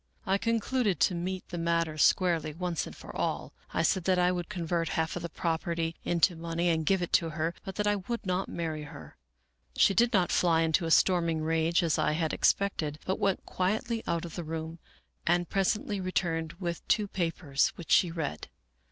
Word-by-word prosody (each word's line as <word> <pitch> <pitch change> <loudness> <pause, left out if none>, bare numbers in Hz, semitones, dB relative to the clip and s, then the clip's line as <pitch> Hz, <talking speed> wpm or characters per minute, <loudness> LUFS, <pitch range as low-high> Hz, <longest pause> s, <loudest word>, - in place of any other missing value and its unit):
" - - -37
I 195 0 +1
concluded 230 -2 0
to - - +4
meet 180 +2 -4
the 175 - -4
matter 165 -1 0
squarely 165 -1 +2
once 175 -1 -2
for - - -10
all. - - -2 0.2
I 165 - 0
said 180 +2 +1
that 185 -1 +3
I 180 0 +3
would 175 -2 -3
convert 170 -3 -1
half 160 0 0
of 175 - -4
the 170 - -4
property 165 0 -2
into 175 0 +2
money 170 +1 -1
and 160 -2 0
give 190 -2 +3
it 175 - -5
to 165 - +3
her, 160 +2 -2
but 190 - -7
that 210 - -1
I 205 0 +2
would 230 +4 -5
not 185 +1 -1
marry 160 -3 -4
her. 80 - -11 0.6
She - - +5
did 235 +3 +3
not 185 -6 +2
fly 165 -2 +3
into 160 +2 +1
a - - -1
storming 170 -2 +3
rage 165 +2 +2
as 165 -2 +1
I 150 - +2
had 160 0 -1
expected, 160 -7 +1
but 190 - -1
went 195 -2 0
quietly 220 +5 -1
out 170 0 -1
of 165 - -8
the 175 - -4
room 160 +1 -5 0.5
and 175 +1 +2
presently 200 +1 0
returned 165 -3 -1
with 170 -1 -4
two 210 -1 +2
papers, 165 -7 0
which 170 - -8
she 180 - +5
read. 160 - -4
170 Hz, 200 wpm, -29 LUFS, 165-190 Hz, 0.6 s, She